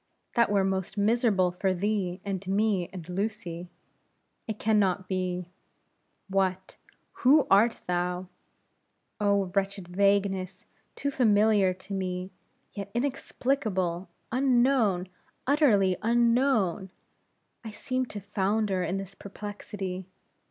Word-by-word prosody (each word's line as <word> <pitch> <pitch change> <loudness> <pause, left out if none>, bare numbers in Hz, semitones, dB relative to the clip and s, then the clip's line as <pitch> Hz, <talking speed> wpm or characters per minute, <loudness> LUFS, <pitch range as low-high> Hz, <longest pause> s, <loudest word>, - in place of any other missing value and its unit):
that 235 -1 +3
were 200 -1 +3
most 190 0 -2
miserable 205 -3 +3
for 185 +1 0
thee, 190 -1 -1
and 195 -1 -4
me, 195 -2 +1
and 175 -4 -8
Lucy. 180 -3 -4 0.8
It 220 -2 -3
can 215 0 +2
not 190 -1 +1
be. 180 -1 -2 0.8
What, 190 -1 -1 0.5
who 280 +4 +6
art 220 +4 +4
thou? 180 +1 -1 0.9
Oh! 200 -3 +1
wretched 195 -2 -1
vagueness 195 0 +1 0.3
too 280 - -2
familiar 210 -5 +4
to 190 +2 -9
me, 185 -1 -3 0.4
yet 200 -1 -6
inexplicable, 220 -9 -1 0.2
unknown, 245 -7 +2 0.4
utterly 230 -10 +4
unknown! 230 -4 +2 0.7
I 225 - -6
seem 255 +4 -2
to 205 - -6
founder 200 0 0
in 180 +2 -1
this 195 0 -6
perplexity. 200 -2 -6
200 Hz, 110 wpm, -28 LUFS, 185-220 Hz, 0.9 s, who